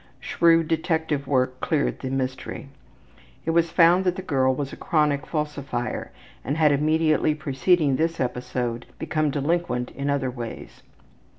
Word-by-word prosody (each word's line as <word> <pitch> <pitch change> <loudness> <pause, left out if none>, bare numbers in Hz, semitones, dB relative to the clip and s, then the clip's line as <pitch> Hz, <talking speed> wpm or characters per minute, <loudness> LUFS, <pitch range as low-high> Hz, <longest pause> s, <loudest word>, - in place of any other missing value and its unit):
Shrewd 165 -1 +3
detective 160 -3 -1
work 130 -2 +1
cleared 155 -3 0
the 130 - -4
mystery. 130 +1 -4 0.8
It 165 - +1
was 170 0 +2
found 175 +2 +5
that 180 -1 +1
the 190 - -6
girl 130 -6 +1
was 140 0 -4
a - - -5
chronic 150 -5 0
falsifier 145 -5 -3 0.3
and 145 - -2
had 155 -2 +4
immediately 155 +1 +2
preceding 150 0 +1
this 165 +1 0
episode 125 -1 -3
become 155 -1 0
delinquent 145 -3 -1
in 140 +1 -3
other 140 -2 0
ways. 120 -2 -8
150 Hz, 140 wpm, -24 LUFS, 130-165 Hz, 0.8 s, found